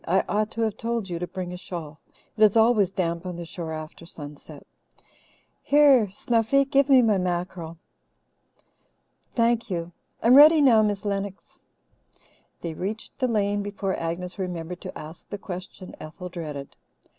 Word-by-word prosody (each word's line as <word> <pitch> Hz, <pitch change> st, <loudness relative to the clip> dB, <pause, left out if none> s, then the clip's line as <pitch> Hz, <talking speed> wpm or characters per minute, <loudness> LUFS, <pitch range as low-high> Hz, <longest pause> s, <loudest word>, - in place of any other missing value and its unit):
"I 185 Hz, +3 st, +3 dB
ought 210 Hz, +1 st, 0 dB
to 230 Hz, -, -3 dB
have 220 Hz, -2 st, 0 dB
told 230 Hz, -4 st, -2 dB
you 170 Hz, -1 st, -3 dB
to 180 Hz, -, -3 dB
bring 180 Hz, +1 st, -5 dB
a -, -, -6 dB
shawl. 165 Hz, -4 st, -7 dB, 0.4 s
It 220 Hz, -, -7 dB
is 215 Hz, +1 st, +5 dB
always 220 Hz, -4 st, +4 dB
damp 170 Hz, -3 st, -2 dB
on 180 Hz, -1 st, -5 dB
the 170 Hz, 0 st, -6 dB
shore 165 Hz, -1 st, -6 dB
after 155 Hz, +1 st, -8 dB
sunset. 145 Hz, -3 st, -9 dB, 1.0 s
Here, 280 Hz, -7 st, +5 dB
Snuffy, 230 Hz, +7 st, +1 dB
give 275 Hz, +1 st, +2 dB
me 260 Hz, -2 st, +7 dB
my 215 Hz, -4 st, +3 dB
mackerel. 175 Hz, -2 st, -3 dB, 1.6 s
Thank 230 Hz, -1 st, +2 dB
you. 170 Hz, -2 st, -3 dB, 0.3 s
I'm 235 Hz, -, +6 dB
ready 305 Hz, +4 st, +9 dB
now, 245 Hz, -6 st, +6 dB
Miss 205 Hz, -1 st, -1 dB
Lennox." 200 Hz, -1 st, -4 dB, 1.0 s
They 165 Hz, -2 st, -4 dB
reached 205 Hz, -, -5 dB
the 255 Hz, -, +2 dB
lane 205 Hz, -3 st, 0 dB
before 200 Hz, -1 st, -3 dB
Agnes 180 Hz, +3 st, -4 dB
remembered 180 Hz, -1 st, -5 dB
to -, -, -7 dB
ask 155 Hz, +2 st, -11 dB
the 205 Hz, -, -4 dB
question 185 Hz, -2 st, -8 dB
Ethel 170 Hz, +4 st, -8 dB
dreaded. 150 Hz, -6 st, -7 dB
190 Hz, 155 wpm, -25 LUFS, 170-225 Hz, 1.6 s, ready